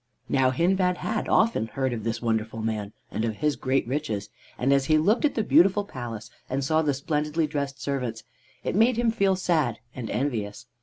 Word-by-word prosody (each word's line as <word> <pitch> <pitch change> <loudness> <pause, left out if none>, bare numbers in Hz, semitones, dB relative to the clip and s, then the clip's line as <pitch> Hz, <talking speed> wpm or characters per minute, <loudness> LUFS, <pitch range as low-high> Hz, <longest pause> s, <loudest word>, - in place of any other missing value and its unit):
Now 130 -1 +3
Hindbad 180 +6 +2
had 220 0 -2
often 220 - +3
heard 130 +3 -1
of 110 -3 -4
this 115 +1 -3
wonderful 110 -1 -1
man 105 -2 -2 0.2
and 110 - -2
of 110 -2 -1
his 150 +4 0
great 130 +1 0
riches, 130 -7 -2 0.3
and 135 +3 +2
as 140 -1 +3
he 155 +1 +4
looked 205 - +3
at 295 - +1
the 220 - +1
beautiful 200 +1 +4
palace 115 - -7 0.2
and 135 +1 -1
saw 155 +4 +2
the 145 -3 +1
splendidly 150 +3 0
dressed 140 -2 -3
servants 125 -6 -3 0.4
it - - -2
made 225 +3 +4
him 235 -1 +2
feel 200 -4 +2
sad 160 - +1 0.2
and 120 -4 -6
envious. 115 -4 -2
140 Hz, 195 wpm, -26 LUFS, 115-170 Hz, 0.4 s, he